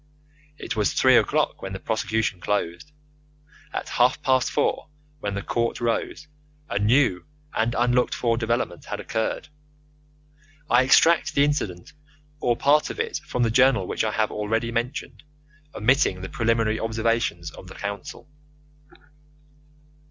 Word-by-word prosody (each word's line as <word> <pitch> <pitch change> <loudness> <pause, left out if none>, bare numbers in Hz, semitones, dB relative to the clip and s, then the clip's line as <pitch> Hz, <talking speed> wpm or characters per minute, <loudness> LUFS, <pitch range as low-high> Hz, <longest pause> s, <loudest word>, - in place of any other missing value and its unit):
It - - -5
was 105 -2 +1
three - - +5
o'clock - - +1
when 95 0 -6
the 95 - -5
prosecution 110 -3 -1
closed. 100 - -2 0.8
At - - -4
half 125 +1 +2
past 130 -1 +2
four, - - -1 0.3
when 100 -5 -3
the 100 - -4
court 115 -1 -1
rose, 120 +5 -2 0.4
a 100 - -2
new 110 -3 +2 0.3
and 115 +2 0
unlooked 125 +1 +2
for 115 -2 +1
development 115 -6 -2
had - - -5
occurred. 110 0 -3 1.2
I 120 - +6
extract 160 +4 +4
the 140 - +5
incident, 105 -12 -2 0.5
or 120 -4 +1
part 145 +4 +3
of - - -7
it, 460 0 -1
from 125 - 0
the 115 - +1
journal 125 -5 +4
which - - -2
I 110 - 0
have 110 +1 0
already 110 +2 -1
mentioned, 120 +2 -4 0.5
omitting 110 -5 +2
the 95 - -6
preliminary 115 -1 0
observations 115 -7 -1
of 90 - -12
the 95 - -11
counsel. 100 -2 -6
115 Hz, 140 wpm, -24 LUFS, 105-125 Hz, 1.2 s, I